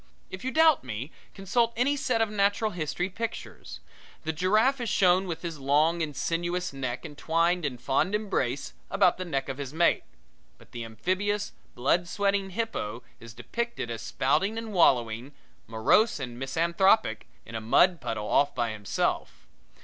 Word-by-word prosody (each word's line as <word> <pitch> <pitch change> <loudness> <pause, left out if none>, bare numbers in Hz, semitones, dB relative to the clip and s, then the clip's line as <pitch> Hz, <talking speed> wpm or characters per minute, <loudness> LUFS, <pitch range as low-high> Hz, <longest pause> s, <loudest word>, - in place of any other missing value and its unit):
If 185 +4 -7
you 260 - -1
doubt 320 +2 +4
me 125 +4 -5 0.2
consult 230 +4 +1
any 265 +5 +2
set 250 -4 0
of 215 - -3
natural 205 +1 +1
history 175 +1 -2
pictures. 225 +4 -6 0.4
The 160 0 -2
giraffe 215 - +2
is 235 - -2
shown 185 0 +3
with 170 -1 -5
his 165 -3 -5
long 150 +5 +2
and 150 -3 -3
sinuous 175 +2 -2
neck 130 -2 -4
entwined 165 +3 0
in 130 -4 -3
fond 135 - 0
embrace 145 - -2 0.2
about 190 -2 +3
the 185 - -3
neck 135 -5 -2
of 135 0 -5
his 140 +1 -6
mate; 170 +1 +3 0.5
but - - -20
the 120 - -6
amphibious, 190 - -2 0.2
blood 175 +8 +1
sweating 200 0 0
hippo 180 - -3 0.2
is 115 -1 -12
depicted 235 - -4
as 115 -1 -5
spouting 195 - 0
and 225 -2 -5
wallowing, 125 - +2 0.3
morose 115 - +3
and 125 -3 -6
misanthropic, 170 +10 +2 0.2
in 115 - -11
a 110 - -3
mud 175 +10 +4
puddle 105 -2 -3
off 145 - +2
by 120 -3 0
himself. 105 -2 -2
170 Hz, 160 wpm, -27 LUFS, 135-205 Hz, 0.5 s, doubt